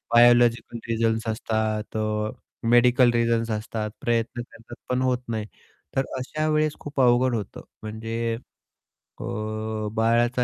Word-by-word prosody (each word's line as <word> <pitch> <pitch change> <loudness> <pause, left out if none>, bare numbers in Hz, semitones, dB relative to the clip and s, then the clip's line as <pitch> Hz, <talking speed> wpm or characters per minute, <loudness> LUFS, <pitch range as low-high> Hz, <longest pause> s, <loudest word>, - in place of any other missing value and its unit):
Biological 120 0 +5
reasons 115 -1 0
असतात, 110 -1 -1
अ, - - +1 0.7
medical 120 +1 +5
reasons 115 -1 +1
असतात. 110 0 -3
प्रयत्न 120 +1 0
करतात, 115 +1 -12
पण 125 0 +1
होत 130 -1 +2
नाही. 110 -2 -2 0.5
तर 135 - +3
अशा 155 +4 -2
वेळेस 155 0 +2
खूप 145 -2 -2
अवघड 125 0 +4
होतं. 105 -4 -5 0.2
म्हणजे 115 +1 -3 0.8
अ, - - -4 0.7
बाळाचा 120 +2 +2
115 Hz, 120 wpm, -25 LUFS, 110-125 Hz, 0.8 s, Biological